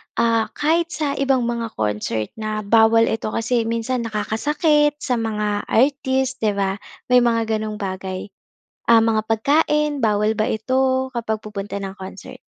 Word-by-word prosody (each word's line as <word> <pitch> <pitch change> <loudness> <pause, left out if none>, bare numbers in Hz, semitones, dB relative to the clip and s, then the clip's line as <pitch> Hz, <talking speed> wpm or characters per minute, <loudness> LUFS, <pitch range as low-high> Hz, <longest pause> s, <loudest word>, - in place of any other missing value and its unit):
ah, 230 -1 +2
kahit 330 +3 +1
sa 310 -4 -2
ibang 270 -2 +2
mga 235 -1 -2
concert 105 +1 -2
na 215 0 -3
bawal 225 +2 +4
eto, 220 - -2
kasi 230 0 0
minsan 230 +1 -2
nakakasakit 295 +8 +1
sa 245 -2 0
mga 210 -2 -2
artist 265 +1 +1
'di 210 -2 0
ba, 195 0 -1 0.3
may 250 - +7
mga 235 -2 +2 0.2
ganong 215 0 -4
bagay, 190 -1 -5 0.6
ah, 230 -1 +6
mga 225 -1 +2
pagkain 295 +5 +2
bawal 210 -2 +2
ba 215 0 0
ito 260 +3 0
kapag 225 -3 -3
pupunta 205 -1 -6
ng 195 - -4
concert? 190 0 -9
225 Hz, 150 wpm, -21 LUFS, 210-260 Hz, 0.6 s, may